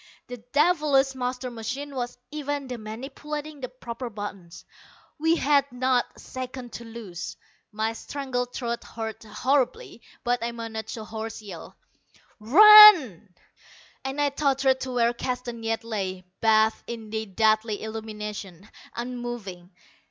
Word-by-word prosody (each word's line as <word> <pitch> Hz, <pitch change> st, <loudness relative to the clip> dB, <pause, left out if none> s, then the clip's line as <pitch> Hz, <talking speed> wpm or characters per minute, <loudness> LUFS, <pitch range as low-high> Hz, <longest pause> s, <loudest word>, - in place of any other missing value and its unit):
The 245 Hz, -, -6 dB
devilish 280 Hz, +2 st, +2 dB
master 250 Hz, 0 st, -3 dB
machine 260 Hz, +5 st, -5 dB
was 245 Hz, -2 st, -4 dB
even 290 Hz, -1 st, -3 dB
then 245 Hz, -3 st, -6 dB
manipulating 290 Hz, +6 st, -7 dB
the 255 Hz, -, -4 dB
proper 245 Hz, -1 st, -7 dB
buttons. 200 Hz, -5 st, -8 dB, 0.5 s
We 325 Hz, +2 st, +3 dB
had 280 Hz, -3 st, +2 dB
not 250 Hz, 0 st, +1 dB
a -, -, -16 dB
second 255 Hz, -2 st, -7 dB
to 235 Hz, -, -7 dB
lose! 220 Hz, -7 st, -7 dB, 0.3 s
My 220 Hz, +1 st, -1 dB
strangled 250 Hz, 0 st, -4 dB
throat 235 Hz, -2 st, -3 dB
hurt 220 Hz, -1 st, -6 dB
horribly, 240 Hz, +2 st, -1 dB, 0.2 s
but 245 Hz, 0 st, +1 dB
I 235 Hz, 0 st, -2 dB
managed 225 Hz, -1 st, -6 dB
a 220 Hz, -, -7 dB
hoarse 220 Hz, 0 st, -6 dB
yell, 185 Hz, -6 st, -10 dB, 0.6 s
"Run!" 335 Hz, -, +9 dB, 0.7 s
and 270 Hz, +2 st, -4 dB
I 290 Hz, 0 st, +3 dB
tottered 270 Hz, -2 st, +2 dB
to 260 Hz, -, -4 dB
where 240 Hz, -1 st, +2 dB
Keston 245 Hz, -1 st, -4 dB
yet 225 Hz, 0 st, -2 dB
lay, 190 Hz, -5 st, -4 dB, 0.2 s
bathed 220 Hz, 0 st, +3 dB
in 225 Hz, -2 st, -7 dB
the 220 Hz, 0 st, -3 dB
deadly 215 Hz, +1 st, +1 dB
illumination, 210 Hz, -3 st, -7 dB, 0.2 s
unmoving. 240 Hz, -7 st, -6 dB
240 Hz, 130 wpm, -26 LUFS, 220-265 Hz, 0.7 s, Run